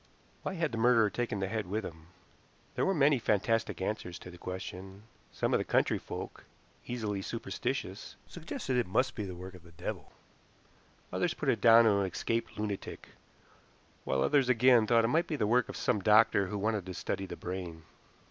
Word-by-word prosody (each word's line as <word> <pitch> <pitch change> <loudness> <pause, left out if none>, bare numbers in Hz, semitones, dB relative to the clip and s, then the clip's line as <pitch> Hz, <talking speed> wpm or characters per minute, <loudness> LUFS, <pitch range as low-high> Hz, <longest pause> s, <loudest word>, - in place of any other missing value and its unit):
Why 190 - -4
had 165 -4 -1
the 115 - -3
murderer 115 -3 +4
taken 120 -4 -2
the 95 - 0
head 110 -1 -3
with 105 +2 -2
him? 80 -1 -10 0.7
There - - 0
were 195 - +3
many 145 -2 +4
fantastic 115 0 0
answers 95 -4 -3
to 90 - -11
the 90 - -12
question. 95 +2 -7 0.3
Some - - -1
of - - +4
the - - 0
country - - +1
folk, - - -8 0.4
easily 110 -5 -3
superstitious, - - -4
suggested 130 - -5
that 125 - +3
it 120 - -1
must 125 +8 +1
be 105 - -4
the 90 -2 -6
work 95 +2 -9
of 90 - -13
the 85 0 -18
devil, - - -6 1.0
others - - 0
put - - -2
it - - +1
down 115 0 +8
to 105 -3 +4
an 100 - +1
escaped 115 +5 -3
lunatic, 105 -2 -5 0.9
while 65 0 0
others 140 -4 +3
again 120 -2 +5
thought 115 -1 +4
it - - +2
might 160 +8 +1
be 155 - -2
the 110 - 0
work 120 +2 +2
of - - -6
some 105 - +1
doctor 105 -1 +5
who 105 +2 -4
wanted 105 -2 -1
to 90 - -6
study 95 - -3
the - - -6
brain. 90 -3 -6
105 Hz, 195 wpm, -31 LUFS, 95-120 Hz, 1.0 s, down